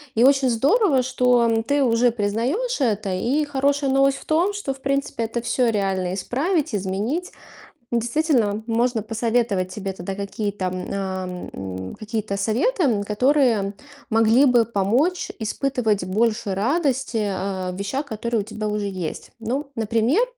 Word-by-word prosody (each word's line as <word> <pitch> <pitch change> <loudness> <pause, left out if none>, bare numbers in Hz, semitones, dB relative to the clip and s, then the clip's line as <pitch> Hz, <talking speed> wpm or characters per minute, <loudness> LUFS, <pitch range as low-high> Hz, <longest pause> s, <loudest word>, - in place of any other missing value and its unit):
И 230 - +4
очень 270 0 +5
здорово, 275 - +3
что 245 -3 +2
ты 285 0 +2
уже 240 0 +3
признаешь 240 - -1
это. 215 -6 0
И 255 +11 +1
хорошая 280 0 +1
новость 275 0 +3
в - - -14
том, 345 +6 +2
что, 400 -10 -3
в 265 - -19
принципе, 275 -3 -1
это 230 +1 -2
всё 240 +1 +1
реально 190 -3 -1
исправить, 275 - -1
изменить. 205 - -2 0.6
Действительно, 235 -3 +1
можно 235 0 +1
посоветовать 225 -3 0
тебе 195 -1 -4
тогда 190 +1 -6
какие-то, 200 -1 -3
ам, 185 0 -4
м, 95 -1 -6
какие-то 215 -2 -3
советы, 245 - +1
м, 225 -8 +2
которые 225 -2 +2 0.4
могли 225 +4 +5
бы 245 -3 +5
помочь 235 - 0
испытывать 220 -3 0
больше 215 +1 0
радости, 260 - 0
а, 190 -1 -3
в - - -7
вещах, 200 +10 -3
которые 230 -2 -2
у - - -4
тебя 215 0 -5
уже 210 0 -2
есть. 185 -4 -5
Ну, 265 +6 -3
например, 230 - +2
230 Hz, 145 wpm, -23 LUFS, 200-270 Hz, 0.6 s, очень